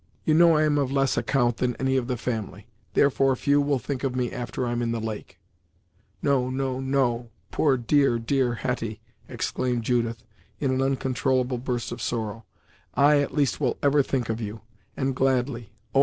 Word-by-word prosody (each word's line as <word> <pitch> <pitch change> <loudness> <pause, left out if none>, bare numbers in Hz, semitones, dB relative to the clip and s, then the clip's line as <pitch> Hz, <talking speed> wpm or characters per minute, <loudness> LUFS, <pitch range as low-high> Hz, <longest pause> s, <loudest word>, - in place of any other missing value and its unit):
You 155 - +3
know 165 0 +6
I 155 - +3
am 150 -1 +2
of 135 -2 0
less 135 -1 +2
account 120 0 +1
than 125 -1 0
any 130 0 0
of 125 -2 0
the 125 -1 -1
family; 110 -4 -4 0.3
therefore 135 -1 +3
few 145 +3 +2
will 140 -1 +1
think 130 +2 -4
of 130 -2 -1
me 125 -1 -1
after 125 +1 -3
I'm 120 0 -1
in 115 -1 0
the 115 - -2
lake." 110 -4 -6 0.9
"No, 130 -3 +2
no, 130 0 -2
no 130 -3 0 0.2
poor, 140 -4 +2
dear, 135 +1 +3
dear 120 +1 0
Hetty!" 115 -3 -3 0.3
exclaimed 125 -2 -2
Judith, 115 -1 0 0.4
in 135 -3 0
an 130 0 +1
uncontrollable 130 -1 0
burst 120 -1 -3
of 120 0 -6
sorrow, 110 -2 -3 0.5
"I, 145 +1 +5
at 145 - -2
least, 140 -6 +1
will 130 - +1
ever 145 0 +4
think 130 -3 -1
of 115 +1 -2
you; 110 0 -5 0.4
and 135 -1 0
gladly, 125 -3 0 0.2
oh! 135 - +4
130 Hz, 185 wpm, -25 LUFS, 120-135 Hz, 0.9 s, know